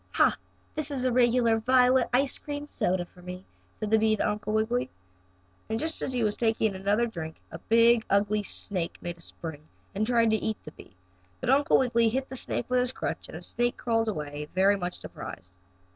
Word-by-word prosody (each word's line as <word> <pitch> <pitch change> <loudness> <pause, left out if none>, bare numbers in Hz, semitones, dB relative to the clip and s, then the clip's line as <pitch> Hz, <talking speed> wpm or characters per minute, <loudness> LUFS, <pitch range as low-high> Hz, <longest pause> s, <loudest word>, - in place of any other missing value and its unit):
"Ha! - - +4 0.4
That 310 0 -2
is 265 -3 -2
a 255 - +2
regular 240 -2 +3
violet 255 +2 +4
ice 265 +2 +2
cream 290 0 -5
soda 180 -1 0
for 180 - -19
me!" 180 +1 -8 0.3
said 215 -1 -4
the 220 - +5
bee 220 0 +3
to - - 0
Uncle 210 0 -2
Wiggily. 220 +3 0 0.8
And 220 0 -1
just 320 +1 -3
as - - -2
he 245 -2 0
was 210 -1 +1
taking 225 -2 +1
another 200 +5 +1
drink 160 -8 -6 0.2
a - - -7
big, 230 0 +4
ugly 205 +1 +2
snake 185 -3 -4
made 175 0 -6
a - - -16
spring 160 -2 -8 0.3
and 210 +2 -1
tried 230 -2 +3
to 220 - +3
eat 220 0 -2
the 150 - -8
bee, 105 - -16 0.4
but - - 0
Uncle 280 +1 +4
Wiggily 235 -3 +3
hit 265 +4 -2
the 265 - -6
snake 245 - -3
with 250 0 +2
his 250 0 0
crutch - - -4
and - - -7
the - - -7
snake 240 0 -1
crawled 225 -2 0
away 150 -6 -4
very 195 +2 +5
much 180 -2 -4
surprised. 90 -1 -9
220 Hz, 205 wpm, -28 LUFS, 195-245 Hz, 0.8 s, the